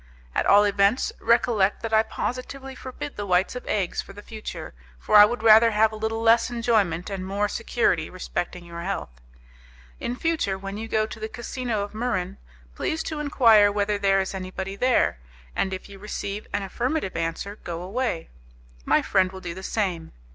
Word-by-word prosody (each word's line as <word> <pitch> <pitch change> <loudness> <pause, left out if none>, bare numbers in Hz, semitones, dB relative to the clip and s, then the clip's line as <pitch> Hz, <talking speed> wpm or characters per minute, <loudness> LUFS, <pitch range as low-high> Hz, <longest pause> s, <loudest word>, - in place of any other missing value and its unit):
At - - 0
all 205 +1 +7
events, 200 +3 +2
recollect 225 -4 +2
that 225 -1 -3
I 220 - +6
positively 255 +4 -5
forbid 260 +2 -7
the 205 - -3
whites 185 +5 +2
of 250 - -7
eggs 195 -4 0
for - - -13
the 205 +1 -11
future, 215 - -7 0.2
for 140 - 0
I 210 0 +11
would 235 +1 -3
rather 225 +1 +8
have 220 0 +3
a - - -7
little 220 +1 -2
less 230 +2 +5
enjoyment 215 -7 0
and 195 -1 -4
more 200 +2 0
security 205 -8 0
respecting 180 -1 -4
your 170 0 -7
health. 170 - -5 0.8
In 245 - -3
future, 305 -11 0
when 195 +1 -6
you 225 - -5
go 220 -1 +1
to 220 - -9
the 220 0 -4
casino 235 -1 -3
of 205 - -7
Muran, 215 -6 -2 0.4
please 315 - -2
to 310 -2 -4
enquire 230 -8 +5
whether 205 0 0
there 195 -1 +3
is 190 0 -2
anybody 190 +1 -5
there, 245 - +2 0.4
and 190 - 0
if 190 - -6
you 195 -1 -12
receive 205 0 -5
an 205 0 -1
affirmative 240 - -2
answer, 165 +5 -3
go 170 -3 -6
away. 200 -3 -2 0.6
My - - +3
friend 185 -1 +2
will 190 - -8
do 170 -2 -5
the 190 - -8
same. 185 -6 -2
205 Hz, 185 wpm, -25 LUFS, 190-230 Hz, 0.8 s, I